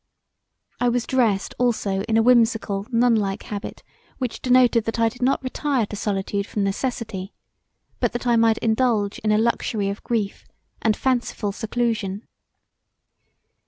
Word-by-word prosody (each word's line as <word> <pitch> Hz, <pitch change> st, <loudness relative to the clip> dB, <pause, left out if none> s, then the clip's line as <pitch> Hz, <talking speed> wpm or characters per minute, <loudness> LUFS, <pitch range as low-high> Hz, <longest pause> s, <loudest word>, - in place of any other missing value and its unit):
I 245 Hz, -, +2 dB
was 240 Hz, 0 st, 0 dB
dressed 225 Hz, -7 st, +1 dB
also 215 Hz, -6 st, +1 dB
in 220 Hz, -, +3 dB
a 225 Hz, -, +4 dB
whimsical 225 Hz, -4 st, +2 dB
nunlike 225 Hz, -4 st, +2 dB
habit 205 Hz, 0 st, -7 dB, 0.3 s
which 250 Hz, -3 st, -4 dB
denoted 250 Hz, -3 st, +4 dB
that 225 Hz, +1 st, -2 dB
I 230 Hz, 0 st, +4 dB
did 250 Hz, +3 st, -15 dB
not 265 Hz, +2 st, +1 dB
retire 260 Hz, -2 st, 0 dB
to 210 Hz, -, -7 dB
solitude 200 Hz, 0 st, -2 dB
from 205 Hz, -, -2 dB
necessity, 195 Hz, -2 st, -3 dB, 0.6 s
but -, -, +1 dB
that 240 Hz, +1 st, -4 dB
I 240 Hz, -1 st, +3 dB
might 225 Hz, -1 st, +4 dB
indulge 220 Hz, -3 st, +1 dB
in 215 Hz, -, 0 dB
a 210 Hz, -, +4 dB
luxury 220 Hz, -2 st, 0 dB
of 200 Hz, -, -6 dB
grief, 215 Hz, -4 st, -2 dB, 0.3 s
and 220 Hz, -1 st, +2 dB
fanciful 245 Hz, -5 st, -1 dB
seclusion. 220 Hz, -2 st, -2 dB
225 Hz, 145 wpm, -23 LUFS, 205-245 Hz, 0.6 s, a